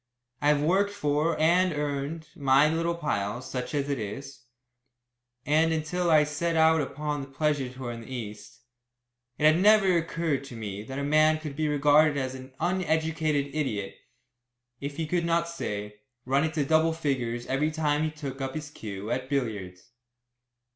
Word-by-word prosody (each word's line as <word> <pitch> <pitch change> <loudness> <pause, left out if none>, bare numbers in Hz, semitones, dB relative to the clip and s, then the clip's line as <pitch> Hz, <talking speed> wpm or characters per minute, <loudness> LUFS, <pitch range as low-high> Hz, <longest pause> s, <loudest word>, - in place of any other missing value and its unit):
I 145 - +1
have 150 -1 +3
worked 190 +6 +3
for, 155 -4 0
and 180 +4 +4
earned, 150 +2 -3
my 135 +1 +4
little 165 +2 0
pile, 115 -9 -2
such 125 +3 -5
as 140 -1 0
it 140 -3 -1
is, 135 +6 -7 1.0
and 160 +2 +3
until 160 +3 -1
I 155 -2 +6
set 150 +3 -2
out 160 0 +5
upon 145 +1 -3
that 135 0 -11
pleasure 145 -4 0
tour 130 -1 -6
in 115 0 -7
the 115 - -12
East, 110 -2 -7 0.8
it 150 - +1
had 155 +3 +5
never 205 -3 +5
occurred 165 -4 -1
to 130 - -9
me 105 -3 -5
that 130 +5 -7
a 140 - -2
man 155 +2 +4
could 155 -3 -7
be 155 +1 0
regarded 150 +1 +4
as 130 -1 -2
an 130 0 -10
uneducated 160 -5 0
idiot 115 -10 -2 0.9
if 140 0 -5
he 165 - -1
could 170 +2 0
not, 170 0 +1
say, 105 -11 -5 0.3
run 135 +4 +2
into 155 -2 -1
double 160 +2 +3
figures 125 -7 -2
every 140 +3 0
time 150 -1 0
he 155 - +1
took 140 -3 -7
up 135 +1 -3
his 150 -2 -5
cue 105 -4 -6
at 130 +1 -2
billiards. 110 -7 -3
150 Hz, 170 wpm, -27 LUFS, 130-160 Hz, 1.0 s, I